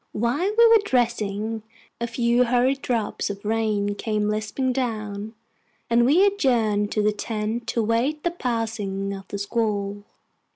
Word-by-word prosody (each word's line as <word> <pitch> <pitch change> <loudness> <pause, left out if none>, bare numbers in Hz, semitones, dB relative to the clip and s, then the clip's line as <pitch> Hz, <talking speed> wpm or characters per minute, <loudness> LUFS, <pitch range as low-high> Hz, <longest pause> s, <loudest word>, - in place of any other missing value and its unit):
While 250 - 0
we 465 0 +8
were 455 -2 +6
dressing, 225 - 0 0.4
a 235 - -1
few 235 +1 +2
hurried 255 +3 +2
drops 230 -5 -1
of 200 0 -7
rain 210 -2 0
came 210 0 -1
lisping 215 +5 -1
down, 215 -4 -3 0.6
and 235 +1 +4
we 345 +9 +5
adjourned 230 - +1
to 210 - +1
the 210 - +3
tent 220 +2 -3
to 230 - 0
await 235 +8 0
the 345 - +1
passing 220 - -2
of 195 -1 -9
the 200 - -5
squall. 205 -1 -2
225 Hz, 150 wpm, -24 LUFS, 210-245 Hz, 0.6 s, we